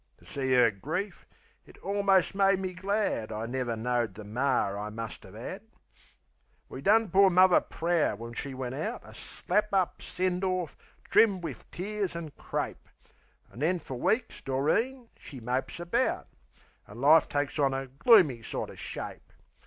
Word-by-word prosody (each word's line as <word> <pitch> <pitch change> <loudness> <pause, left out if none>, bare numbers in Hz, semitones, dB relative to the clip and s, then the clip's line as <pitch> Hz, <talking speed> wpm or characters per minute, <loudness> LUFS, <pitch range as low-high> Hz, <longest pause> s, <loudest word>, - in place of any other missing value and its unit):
To - - -22
see 130 -2 0
'er 125 -3 +5
grief, 160 - -5 0.4
it - - -17
almost 200 -1 +2
made 195 0 +4
me 185 -1 -4
glad 190 - -1
I 110 +1 -3
never 120 -1 -2
knowed 115 -3 -1
the 110 - -8
mar 110 -2 0
I 105 +1 -4
must 115 +1 -7
'ave 100 +1 -12
'ad. 185 - -6 1.1
We 130 - -7
done 215 +4 +3
poor 195 +1 +6
Muvver 185 0 +6
proud 165 -9 0
when 115 +1 -8
she 135 +2 -4
went 130 -1 -4
out 210 - -3
A - - -13
slap 210 0 -2
up 190 -3 +1
send 180 0 -2
orf, 185 -5 -1 0.3
trimmed 200 -5 +4
wiv - - -7
tears 200 0 -3
an' 165 -3 -5
crape. - - -4 0.6
An' - - -12
then 170 +6 +2
fer 145 -5 -8
weeks 215 - -1
Doreen 225 - 0
she 135 - -10
mopes 125 +7 -3
about, 230 +9 0 0.6
An' 105 +3 -11
life 150 +4 +6
takes 145 +1 -2
on 135 -2 +2
a 135 0 -3
gloomy 140 - +4
sorter - - -5
shape. - - -7
155 Hz, 160 wpm, -29 LUFS, 125-195 Hz, 1.1 s, poor